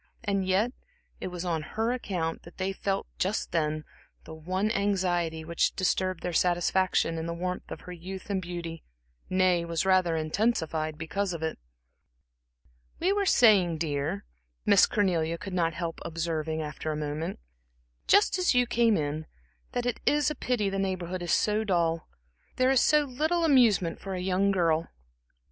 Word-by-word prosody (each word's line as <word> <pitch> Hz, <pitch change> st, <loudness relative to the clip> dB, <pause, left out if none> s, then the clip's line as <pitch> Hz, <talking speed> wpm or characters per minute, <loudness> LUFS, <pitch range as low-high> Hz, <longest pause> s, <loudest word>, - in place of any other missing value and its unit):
And 195 Hz, -3 st, 0 dB
yet, 200 Hz, +6 st, +2 dB, 0.5 s
it -, -, -4 dB
was 180 Hz, -1 st, -5 dB
on 165 Hz, -3 st, 0 dB
her 225 Hz, +9 st, -2 dB
account 180 Hz, -9 st, -3 dB
that 170 Hz, -, -15 dB
they 190 Hz, +1 st, -1 dB
felt 195 Hz, 0 st, -2 dB
just 195 Hz, +4 st, -1 dB
then 155 Hz, -2 st, -1 dB, 0.4 s
the 160 Hz, -, -10 dB
one 185 Hz, +7 st, -1 dB
anxiety 180 Hz, -6 st, 0 dB
which 170 Hz, +1 st, 0 dB
disturbed 185 Hz, -1 st, 0 dB
their 180 Hz, -, -2 dB
satisfaction 175 Hz, -1 st, +2 dB
in 160 Hz, -, -4 dB
the 170 Hz, -, -3 dB
warmth 180 Hz, +1 st, -4 dB
of -, -, -7 dB
her 180 Hz, -, -10 dB
youth 185 Hz, +3 st, -7 dB
and 190 Hz, -1 st, 0 dB
beauty, 170 Hz, -2 st, -6 dB, 0.5 s
nay, 185 Hz, -2 st, +3 dB
was 170 Hz, +1 st, -1 dB
rather 185 Hz, -3 st, +3 dB
intensified 160 Hz, -2 st, 0 dB
because 180 Hz, +4 st, -2 dB
of 165 Hz, -1 st, -5 dB
it. 160 Hz, -, -3 dB, 1.4 s
"We 370 Hz, +3 st, +2 dB
were 405 Hz, -1 st, 0 dB
saying, 195 Hz, -, +5 dB
dear," 145 Hz, -, -2 dB, 0.4 s
Miss -, -, +6 dB
Cornelia 170 Hz, -5 st, +1 dB
could 190 Hz, +2 st, -7 dB
not 165 Hz, -3 st, +1 dB
help 170 Hz, -2 st, -4 dB
observing 160 Hz, -1 st, -2 dB
after 155 Hz, +1 st, -4 dB
a 150 Hz, -, -3 dB
moment 150 Hz, +2 st, -3 dB, 0.7 s
"just 405 Hz, -2 st, +4 dB
as 360 Hz, -7 st, +2 dB
you 245 Hz, 0 st, +5 dB
came 235 Hz, -2 st, +3 dB
in, 155 Hz, +1 st, -3 dB, 0.5 s
that 245 Hz, -1 st, -1 dB
it 245 Hz, -, -1 dB
is 295 Hz, 0 st, +3 dB
a -, -, -4 dB
pity 240 Hz, -5 st, 0 dB
the 195 Hz, 0 st, -1 dB
Neighborhood 185 Hz, -2 st, -2 dB
is 175 Hz, -, -2 dB
so 215 Hz, +1 st, +2 dB
dull. 170 Hz, -5 st, 0 dB, 0.5 s
There 255 Hz, +1 st, +3 dB
is 265 Hz, -, +4 dB
so 300 Hz, -1 st, +4 dB
little 310 Hz, +6 st, 0 dB
amusement 230 Hz, -, +4 dB
for 195 Hz, -1 st, -5 dB
a -, -, -3 dB
young 190 Hz, +2 st, +1 dB
girl." 165 Hz, -4 st, +2 dB
180 Hz, 165 wpm, -28 LUFS, 165-205 Hz, 1.4 s, Miss